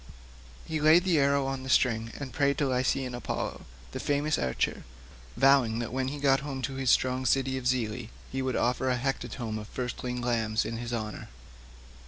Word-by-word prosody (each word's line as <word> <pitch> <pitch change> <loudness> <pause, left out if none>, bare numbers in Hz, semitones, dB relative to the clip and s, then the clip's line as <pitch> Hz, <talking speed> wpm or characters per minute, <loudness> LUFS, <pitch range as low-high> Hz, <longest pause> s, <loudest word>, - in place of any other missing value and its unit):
He 155 -1 -3
laid 155 +3 +6
the 175 -5 +3
arrow 140 0 +3
on 135 -1 -3
the 130 - -7
string 115 -3 +2
and 135 -3 -6
prayed 140 -2 +2
to 145 - +1
Lycian 130 0 0
Apollo, 120 - -4 0.3
the - - -5
famous 145 +2 0
archer, 65 -2 -1 0.5
vowing 135 -4 +4
that 120 0 -4
when 130 0 -1
he 145 +2 -4
got 135 -1 +3
home 135 -2 -5
to 135 - -2
his 135 -1 -1
strong 130 +1 +3
city 130 +1 +1
of 130 -1 -2
Zelea 120 -2 -1 0.2
he 135 - -2
would 130 -1 -1
offer 125 +2 +1
a 125 - +1
hecatomb 120 -3 -3
of 105 - -8
firstling 125 0 -4
lambs 115 -3 0
in 115 - -4
his 120 +1 -5
honour. 110 -3 -4
130 Hz, 190 wpm, -29 LUFS, 120-135 Hz, 0.5 s, laid